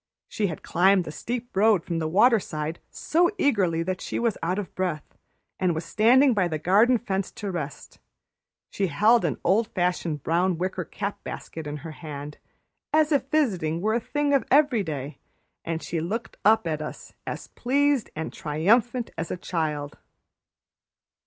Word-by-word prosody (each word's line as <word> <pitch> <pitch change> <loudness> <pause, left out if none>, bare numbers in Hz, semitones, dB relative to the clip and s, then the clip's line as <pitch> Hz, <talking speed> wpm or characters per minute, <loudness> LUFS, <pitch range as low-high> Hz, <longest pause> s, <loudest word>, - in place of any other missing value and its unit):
She 210 - -1
had 165 - -6
climbed 190 +2 +3
the 155 - -6
steep 240 +8 -5
road 205 -3 +4
from 170 -2 -2
the 160 - -1
waterside 170 -5 +2
so 345 +2 +1
eagerly 190 - +2
that 185 +1 -3
she - - -4
was 230 -3 +1
out 175 +3 -1
of 205 -4 -5
breath, 180 -5 -3 0.4
and 180 -3 +1
was 160 +1 -4
standing 250 +7 +5
by 190 -5 +2
the 160 -2 -2
garden 205 +10 +4
fence 195 -4 -2
to 205 -2 -5
rest. 150 -5 -6 0.7
She 195 - 0
held 215 +8 +4
an 150 -8 0
old 210 +5 +3
fashioned 175 -5 -1
brown 175 +2 +1
wicker 185 0 -2
cap 200 +5 -5
basket 160 -2 -7
in 145 0 -4
her 165 - -5
hand, 150 -2 -8 0.5
as 310 0 +3
if 275 -2 +1
visiting 185 - +1
were 215 +4 0
a 235 - +2
thing 290 +4 -1
of 275 - +3
every 280 -5 +4
day, 150 -5 -5 0.4
and 165 0 -4
looked 175 +8 -3
up 220 +2 +4
at 155 -2 -2
us 150 - -8
as - - -5
pleased 280 0 +1
and 160 +1 -4
triumphant 225 +11 +1
as - - -3
a - - -3
child. 155 -5 -3
185 Hz, 165 wpm, -25 LUFS, 160-230 Hz, 0.7 s, standing